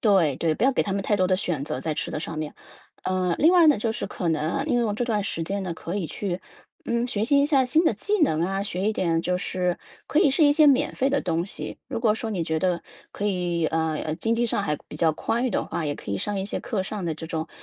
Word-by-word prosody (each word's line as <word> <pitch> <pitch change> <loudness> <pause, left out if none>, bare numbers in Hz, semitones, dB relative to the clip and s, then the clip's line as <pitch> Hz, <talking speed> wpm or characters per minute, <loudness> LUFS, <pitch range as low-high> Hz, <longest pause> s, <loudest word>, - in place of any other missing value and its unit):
对 180 - +3
对， 160 -2 +1
不 215 - 0
要 270 - +4
给 - - +2
他 195 -2 -2
们 200 - -1
太 210 - +1
多 185 - +3
的 185 0 +2
选 170 -7 -2
择 140 - -3
在 160 - -1
吃 150 - -3
的 - - -3
上 160 0 -5
面。 155 -1 -4 0.5
呃， 185 -2 +1
另 320 +4 +5
外 350 -3 +6
呢， 300 - +6
就 225 +2 0
是 225 - -3
可 175 - -3
能 160 -2 +1
啊 275 +10 -1
利 290 -5 0
用 225 -4 +1
这 245 - -1
段 215 -4 0
时 165 - -2
间 195 +4 -2
呢 175 -3 -3
可 170 +4 -5
以 180 -5 -2
去， 185 0 -3 0.4
嗯， 235 0 0
学 220 -3 -1
习 280 +4 +4
一 - - +4
下 275 -4 +4
新 310 +7 +3
的 - - +4
技 410 - -1
能 160 - +3
啊， 195 +2 -1
学 190 -2 -3
一 - - +1
点 165 -5 +1
就 180 +1 0
是 180 -1 -1 0.3
可 305 - +2
以 285 - +5
是 300 +3 +4
一 290 - +6
些 300 0 +6
免 270 - +3
费 270 +1 +1
的 280 - +2
东 170 -1 -1
西。 195 - -6
如 - - -3
果 225 -2 +3
说 220 0 -4
你 180 -6 -1
觉 160 0 -1
得 180 -2 +1 0.3
可 205 - -5
以， 175 -4 0
呃， 160 0 0
呃 155 - -2
经 225 +7 0
济 240 0 +2
上 205 - 0
还 150 -5 0
比 - - -11
较 160 0 +3
宽 235 +9 -1
裕 255 - +1
的 - - 0
话， 165 - -3
也 145 -1 -2
可 100 - -6
以 - - 0
上 205 - -2
一 190 - -2
些 - - -3
课 210 - -2
上 210 -2 -4
的 165 - -1
这 160 +1 -7
种 160 0 -3
195 Hz, 315 characters per minute, -25 LUFS, 165-235 Hz, 0.5 s, 外